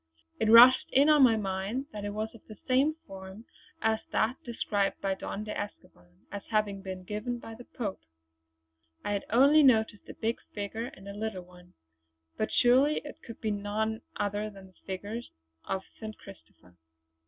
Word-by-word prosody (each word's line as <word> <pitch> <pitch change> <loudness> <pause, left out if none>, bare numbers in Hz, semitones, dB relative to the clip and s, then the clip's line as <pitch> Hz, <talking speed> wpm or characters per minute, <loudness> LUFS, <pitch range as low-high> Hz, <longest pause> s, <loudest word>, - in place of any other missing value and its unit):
It 220 - +2
rushed 245 +3 +9
in 280 +3 +5
on 300 -1 +6
my 245 -4 +7
mind 200 +6 -2
that 210 - -6
it - - -2
was 215 +1 -3
of 230 - -14
the 215 - -11
same 275 +4 +3
form 190 +2 -10 0.4
as 220 0 +2
that 230 +4 +1
described 205 -4 -1
by 195 -1 0
Don 200 +2 -5
de 215 - -5
Escoban 90 - -9
as 200 - -5
having 210 -3 0
been 190 -1 -6
given 215 +6 -3
by 225 -1 -9
the 240 +2 -11
Pope. 210 -6 -5 1.0
I 205 - -1
had 200 - -2
only 275 +7 +6
noticed 220 -6 +3
a - - -8
big 230 +1 -1 0.2
figure 210 +3 -3
and 195 -5 -11
a 200 - -6
little 205 -3 -4
one; 180 0 -18 0.6
but 215 - -1
surely 265 +5 +4
it 295 +2 -10
could 230 - -10
be 220 - 0
none 210 +2 -2
other 205 +1 -2
than 195 -2 -13
a 185 - -29
figure 200 +5 -4 0.4
of 190 0 -2 0.2
St. 215 -1 -7
Christopher. 185 - -16
215 Hz, 175 wpm, -30 LUFS, 195-235 Hz, 1.0 s, rushed